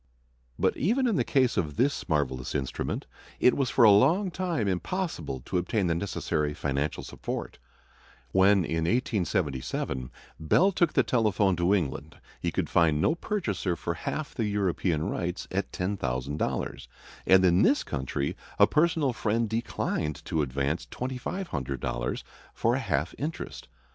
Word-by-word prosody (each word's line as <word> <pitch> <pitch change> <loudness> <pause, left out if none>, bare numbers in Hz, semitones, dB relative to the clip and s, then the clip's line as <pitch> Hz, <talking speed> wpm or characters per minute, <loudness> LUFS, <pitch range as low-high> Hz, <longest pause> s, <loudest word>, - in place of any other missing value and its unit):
But - - +2
even 240 - +2
in 230 -5 +2
the - - +2
case 130 -4 +2
of 75 -4 -1
this 125 - 0
marvelous 65 -5 -1
instrument 65 -1 -2 0.3
it 125 - +5
was 135 -3 0
for 125 - +4
a 110 - +9
long 175 - +4
time 170 - -1
impossible 90 - -2
to 90 - -1
obtain 95 +3 0
the 85 - +2
necessary 75 -4 -1
financial 70 +1 -2
support. - - -6 0.7
When, 95 -1 +5
in 80 0 -1
1877, 85 - -1 0.3
Bell 175 - +4
took 175 -3 +2
the - - +4
telephone 105 -5 +2
to 90 +3 +3
England, 80 -3 -3 0.2
he - - 0
could - - -1
find 80 -3 +3
no 150 - +3
purchaser 160 - -2
for 85 0 -3
half 145 - -4
the 115 - -1
European 95 -5 0
rights 90 +1 -3
at 95 +1 -2
$10,000, 70 -7 -2 0.4
and 95 0 +6
in 90 +1 +5
this 145 - +4
country 70 +1 -3 0.2
a - - +8
personal 155 -4 +2
friend 115 0 0
declined 110 - -2
to 80 - 0
advance 70 +3 -1
$2,500 120 - -3 0.3
for 115 - +2
a 130 - +1
half 75 - -1
interest. 155 +3 -5
95 Hz, 145 wpm, -28 LUFS, 75-125 Hz, 0.7 s, a